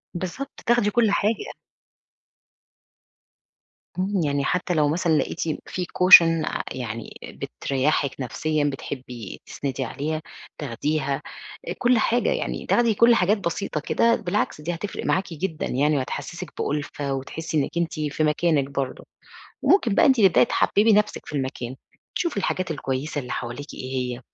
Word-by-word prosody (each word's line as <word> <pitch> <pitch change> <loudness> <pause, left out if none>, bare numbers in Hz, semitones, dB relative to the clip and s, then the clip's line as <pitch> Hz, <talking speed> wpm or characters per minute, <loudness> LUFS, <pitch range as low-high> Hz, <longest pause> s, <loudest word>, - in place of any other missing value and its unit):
بالضبط، 185 +11 -5
تاخدي 235 -3 +3
كل 220 -1 +3
حاجة. 210 +2 +1 2.5
إمم. 190 -1 0
يعني 140 -1 0
حتى 180 0 0
لو 150 -2 +3
مثلًا 160 0 +2
لقيتِ 155 - -2 0.3
في 180 -1 -3
cousin 165 -3 +8
ع - - -2
يعني 115 -3 -5
بتريّحِك 140 +1 -1
نفسيًا، 150 +4 -1
بتحبي 130 -5 -5
تسندي 135 -1 -4
عليها، 155 +6 -3 0.4
تاخديها، 140 +2 -1 0.5
آآ - - -2
كل 245 -1 +3
حاجة 240 - +2
يعني، - - -2
تاخدي 235 -2 +3
كل 235 +3 +5
حاجات 205 +1 +3
بسيطة 170 -3 -2
كده، 230 +9 +2
بالعكس 175 -6 -2
دي 175 +3 -2
هتفرِق 200 +4 -5
معاكِ 185 -2 0
جدًا 165 0 -3
يعني 145 +3 +1
وهتحسسِك 145 +7 -4
بأُلفة، 145 -1 -2
وتحسّي 155 +4 -4
إنِّك 145 +4 -1
أنتِ 170 0 0
في 150 +1 -1
مكانِك 150 -2 +2
برضو. 135 -2 -3 0.6
وممكن 235 - +4
بقى - - +5
أنتِ 260 -4 +4
تبدئي 190 +1 +6
تحببي 220 -1 +3
نفْسِك 210 0 +1
في - - -9
المكان، 130 -2 -4 0.4
تشوفي 340 - -1
الحاجات 185 -2 -1
الكويسة 145 0 -2
اللي 125 -1 -6
حواليكِ 125 +5 -5
إيه 130 +1 -6 0.2
هي، - - -12
155 Hz, 145 wpm, -24 LUFS, 140-200 Hz, 2.5 s, cousin